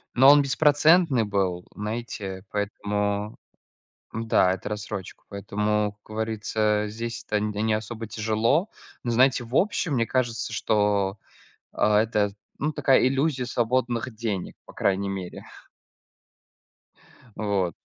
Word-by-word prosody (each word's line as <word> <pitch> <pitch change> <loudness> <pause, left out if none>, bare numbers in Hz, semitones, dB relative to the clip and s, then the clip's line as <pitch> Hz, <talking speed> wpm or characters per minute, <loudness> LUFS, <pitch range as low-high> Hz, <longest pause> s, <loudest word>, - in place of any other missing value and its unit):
Но 130 +3 +8
он 145 0 +8
беспроцентный 150 -1 +4
был, 95 -4 -1
знаете, 105 -3 -5
поэтому 105 0 -2 0.7
Да, 110 -4 +2
это 95 - -4
в - - -7
рассрочку, 105 -2 -6
поэтому, 105 +1 -1
как 110 - -11
говорится, 110 -1 0
здесь 115 +2 -5
это 105 - +1
не 105 0 -2
не 110 0 +2
особо 110 +1 -5
тяжело. 110 - +1 0.3
Но 120 - -1
знаете, 130 +2 +4
в 120 +2 -7
общем, 180 -5 +1
мне 115 -3 +1
кажется, 120 -3 -1
что, 105 -2 +1 0.5
а, 105 0 +3
это, 105 -2 +1 0.3
ну, 150 +2 -1
такая 135 -4 +3
иллюзия 135 0 +1
свободных 120 0 -1
денег, 105 -5 -3
по - - -13
крайней 100 0 0
мере. 95 -2 -6 1.9
Вот. 100 -5 0
110 Hz, 125 wpm, -25 LUFS, 105-120 Hz, 1.9 s, Но